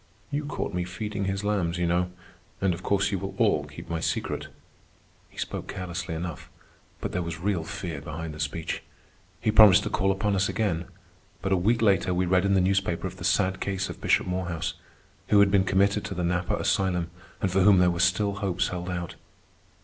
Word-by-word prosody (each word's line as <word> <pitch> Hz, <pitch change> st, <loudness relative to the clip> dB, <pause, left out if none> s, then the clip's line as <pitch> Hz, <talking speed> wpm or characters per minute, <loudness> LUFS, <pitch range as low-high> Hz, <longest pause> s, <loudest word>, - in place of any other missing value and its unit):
"You 145 Hz, +1 st, -1 dB
caught 145 Hz, -8 st, -3 dB
me 90 Hz, 0 st, 0 dB
feeding 100 Hz, +2 st, -4 dB
his 95 Hz, +1 st, -2 dB
lambs, 95 Hz, -5 st, 0 dB
you 90 Hz, -, 0 dB
know. 90 Hz, +1 st, +1 dB, 0.5 s
And 95 Hz, -2 st, +2 dB
of 85 Hz, -, -7 dB
course 100 Hz, +1 st, +1 dB
you 95 Hz, -, -1 dB
will 95 Hz, +1 st, -5 dB
all -, -, +2 dB
keep -, -, -10 dB
my 85 Hz, -1 st, -2 dB
secret." 80 Hz, -, -2 dB, 0.8 s
He -, -, -22 dB
spoke -, -, -4 dB
carelessly 85 Hz, -3 st, -4 dB
enough, 85 Hz, -1 st, -5 dB, 0.5 s
but -, -, -3 dB
there 90 Hz, -, -1 dB
was 85 Hz, -1 st, -5 dB
real 95 Hz, -2 st, 0 dB
fear 80 Hz, -3 st, -5 dB
behind 80 Hz, +1 st, -6 dB
the 75 Hz, -, -10 dB
speech. 75 Hz, +3 st, -3 dB, 0.6 s
He 110 Hz, -, +1 dB
promised 105 Hz, -2 st, +8 dB
to -, -, -3 dB
call 95 Hz, -1 st, +2 dB
upon 100 Hz, +1 st, 0 dB
us 95 Hz, +1 st, +1 dB
again. 95 Hz, -4 st, -1 dB, 0.6 s
But 95 Hz, -, -1 dB
a -, -, +5 dB
week 110 Hz, +6 st, +2 dB
later 95 Hz, -3 st, +3 dB
we 90 Hz, +1 st, +1 dB
read 90 Hz, +1 st, +3 dB
in 100 Hz, 0 st, +3 dB
the 95 Hz, -, +4 dB
newspaper 95 Hz, -2 st, +1 dB
of 95 Hz, 0 st, -5 dB
the 90 Hz, -, -8 dB
sad 95 Hz, +1 st, +2 dB
case 95 Hz, -1 st, -2 dB
of -, -, -11 dB
Bishop -, -, +3 dB
Morehouse, 90 Hz, -3 st, -2 dB, 0.5 s
who 105 Hz, -, +5 dB
had 100 Hz, -1 st, +5 dB
been 95 Hz, -1 st, +4 dB
committed 100 Hz, +2 st, +2 dB
to 100 Hz, -2 st, -5 dB
the 90 Hz, -, -2 dB
Napa 90 Hz, +1 st, 0 dB
Asylum 90 Hz, -3 st, 0 dB, 0.3 s
and 95 Hz, -, 0 dB
for 95 Hz, +1 st, +3 dB
whom 100 Hz, 0 st, +7 dB
there 90 Hz, 0 st, +5 dB
were 85 Hz, -, -3 dB
still 95 Hz, +3 st, +2 dB
hopes 95 Hz, -2 st, 0 dB
held 90 Hz, 0 st, -4 dB
out. 85 Hz, -1 st, -4 dB
95 Hz, 210 wpm, -27 LUFS, 90-100 Hz, 0.8 s, promised